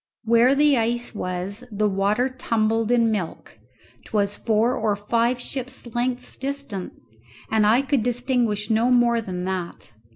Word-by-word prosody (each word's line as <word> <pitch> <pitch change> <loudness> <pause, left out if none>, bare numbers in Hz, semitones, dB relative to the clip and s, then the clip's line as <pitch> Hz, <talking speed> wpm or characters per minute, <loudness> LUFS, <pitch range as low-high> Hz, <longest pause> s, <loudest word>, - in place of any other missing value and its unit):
Where 235 +4 +4
the 290 -2 +4
ice 240 +2 -1
was 190 +3 -4
the 210 0 +1
water 205 +5 +1
tumbled 225 -3 0
in 235 -2 +3
milk; 185 - -5 0.5
'twas 205 -1 0
four 225 +3 +1
or 215 -2 0
five 235 +4 0
ship's 260 0 -5
lengths 245 +1 -2
distant, 270 -8 -5 0.6
and 220 -1 +3
I 235 +5 +4
could 275 -2 +1
distinguish 240 -3 0
no 225 +3 +3
more 240 -2 +3
than 180 -4 -5
that. 185 -9 -5
230 Hz, 140 wpm, -23 LUFS, 210-245 Hz, 0.6 s, Where